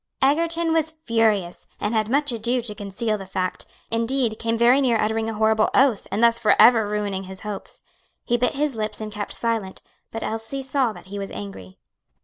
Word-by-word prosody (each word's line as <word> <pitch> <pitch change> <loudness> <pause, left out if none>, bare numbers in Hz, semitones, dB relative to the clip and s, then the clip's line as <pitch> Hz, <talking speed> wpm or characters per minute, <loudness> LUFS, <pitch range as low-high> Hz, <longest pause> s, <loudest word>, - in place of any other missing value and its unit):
Egerton 330 +4 +2
was 320 0 0
furious, 215 -6 +1
and 210 - -1
had 215 -1 +1
much 285 +2 +1
ado 235 +2 -1
to 225 -3 -5
conceal 210 +2 -3
the 195 - -8
fact; 185 -1 -3 0.2
indeed, 230 0 0
came 230 0 -1
very 245 +4 +5
near 240 -4 +2
uttering 220 +1 0
a 225 - -4
horrible 220 0 +3
oath, 260 -6 +3
and 210 +4 -1
thus 235 0 +5
forever 225 0 +5
ruining 205 -2 -2
his 190 0 -9
hopes. 210 -2 -7 0.4
He 240 - +1
bit 245 +1 +1
his 295 0 0
lips 215 -1 -3
and 215 -1 -5
kept 210 -1 -5
silent, 225 -5 -2 0.3
but 225 - -5
Elsie 225 +5 -4
saw 265 -3 0
that 180 -4 -12
he 200 - -4
was 195 - -5
angry. 95 -2 -9
225 Hz, 190 wpm, -23 LUFS, 210-245 Hz, 0.4 s, very